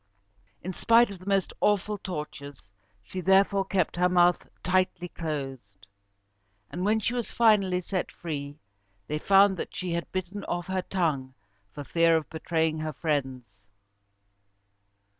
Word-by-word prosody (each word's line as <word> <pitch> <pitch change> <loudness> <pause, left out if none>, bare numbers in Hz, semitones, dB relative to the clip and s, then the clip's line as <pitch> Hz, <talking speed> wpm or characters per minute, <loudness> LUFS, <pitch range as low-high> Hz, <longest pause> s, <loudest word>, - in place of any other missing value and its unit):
In 185 +2 -4
spite 230 +3 +4
of 195 - -9
the 185 - -14
most 195 -2 +1
awful 210 0 +1
tortures, 150 -6 -7 0.4
she 185 - -6
therefore 195 +1 +4
kept 190 -3 -1
her 180 +1 +3
mouth 175 -1 +3 0.2
tightly 185 -1 0
closed; 135 - -6 0.9
and 180 - -4
when 215 +3 +2
she 230 +3 -1
was 240 -2 -3
finally 200 -6 +3
set 185 +1 -3
free, 145 -3 -6 0.5
they 150 +5 -3
found 195 +2 +5
that - - -6
she 180 -2 -3
had 170 0 -3
bitten 185 +2 -4
off 175 0 -3
her 190 -1 -1
tongue 150 -9 -2 0.4
for 145 - -7
fear 165 +2 +3
of 155 - -4
betraying 160 -1 -1
her 155 0 -3
friends. 135 -5 -2
175 Hz, 140 wpm, -27 LUFS, 155-195 Hz, 0.9 s, found